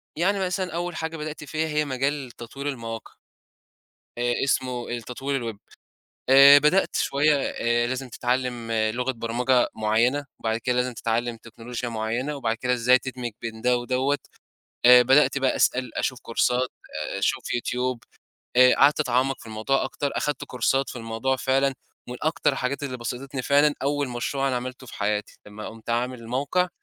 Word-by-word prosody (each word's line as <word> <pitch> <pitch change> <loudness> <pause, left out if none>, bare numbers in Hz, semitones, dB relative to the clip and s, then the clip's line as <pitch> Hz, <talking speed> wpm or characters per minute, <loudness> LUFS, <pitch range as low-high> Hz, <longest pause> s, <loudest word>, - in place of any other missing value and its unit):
يعني 195 +5 +1
مثلًا 185 -1 -2
أول 175 -1 -3
حاجة 160 0 -4
بدأت 150 0 -6
فيها 155 +2 -2
هي 150 0 0
مجال 135 -1 -2
تطوير 135 +5 -8
المواقع. 115 -4 -6 1.0
آآ 120 0 +1
اسمه 130 -2 -1
التطوير 120 0 -3
الWeb، - - -20 0.7
آآ 140 +2 +10
بدأت 150 +7 +3
شويّة 150 +2 +2
آآ 120 -3 0
لازم 130 0 -4
تتعلّم 125 -1 -2
لغة 115 +4 0
برمجة 120 +2 +1
معيّنة، 115 +6 +1
وبعد 110 0 -1
كده 125 +2 -1
لازم 125 0 0
تتعلّم 115 +1 -1
تكنولوجيا 120 +2 -7
معيّنة 115 +6 -2
وبعد 115 -5 -1
كده 125 +1 -1
إزاي 125 +1 +4
تدمِج 125 -3 -5
بين 110 -1 -6
ده 125 0 +3
ودوّة، 130 +3 0 0.7
آآ 125 0 +9
بدأت 135 +3 +4
بقى 135 -1 +1
أسأل 125 0 +1
أشوف 130 -2 -1
كورسات، 125 +2 0 0.5
آآ - - -3
أشوف - - -1
يوتيوب، 125 0 -2 0.5
آآ 125 0 +7
قعدت 145 +2 +4
اتعمّق 130 0 +1
في - - -13
الموضوع 110 +6 0
أكتر 140 +1 -3
اخدت 145 -3 -1
كورسات 135 +2 0
في - - -8
الموضوع 115 +3 -2
فعلًا، 135 +1 +1 0.3
من 125 - -5
أكتر 155 -2 +1
الحاجات 135 +2 -2
اللي 130 -3 -3
بسَطتني 125 +3 -5
فعلًا 145 +2 +4
أول 145 0 0
مشروع 135 +3 -1
أنا 130 - 0
عملته 130 +1 -6
في - - -10
حياتي، 105 0 -2
لمّا 105 +1 -8
قُمت 115 +1 -9
عامل 125 +1 -1
الموقع، 140 +10 0
125 Hz, 160 wpm, -25 LUFS, 120-140 Hz, 1.0 s, آآ